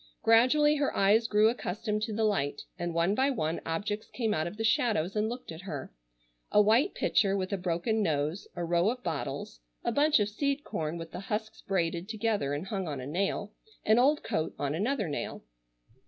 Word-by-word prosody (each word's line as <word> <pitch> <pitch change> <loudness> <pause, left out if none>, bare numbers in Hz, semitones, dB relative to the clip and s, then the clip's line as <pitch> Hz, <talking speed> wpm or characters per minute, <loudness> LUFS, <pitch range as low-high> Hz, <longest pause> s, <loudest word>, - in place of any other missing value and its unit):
Gradually 295 +7 +5
her 285 -1 0
eyes 210 +4 +4
grew 210 0 +4
accustomed 215 -1 -2
to 220 - -2
the 220 +1 -1
light 145 -10 0 0.2
and 175 0 -2
one 170 +4 +2
by 265 +5 +2
one 160 - -1
objects 205 +6 -3
came 225 -4 0
out 155 -1 0
of 195 - -7
the 225 - -2
shadows 220 -5 +1
and 215 +1 +1
looked 245 -6 -6
at 160 +1 -8
her. 145 -8 -6 0.6
A - - +5
white 225 - +4
pitcher 195 -1 +2
with 185 +1 -2
a - - +1
broken 180 +5 0
nose, 155 +2 -1
a 175 -1 -2
row 170 +3 +2
of 250 +1 -4
bottles, 145 - -4 0.2
a - - 0
bunch 295 +3 +4
of 205 - +2
seed 280 +6 -1
corn 155 +1 -3
with 165 -1 -8
the - - -6
husks 220 +1 -3
braided 175 -1 -1
together 220 -9 0
and 150 +5 -4
hung 190 -2 -3
on 145 -3 -4
a 130 - -6
nail, 195 +6 -2 0.3
an 220 +2 +5
old 290 +4 +3
coat 160 - -2
on 140 0 -1
another 210 - 0
nail. 145 - -4
205 Hz, 200 wpm, -30 LUFS, 170-225 Hz, 0.6 s, Gradually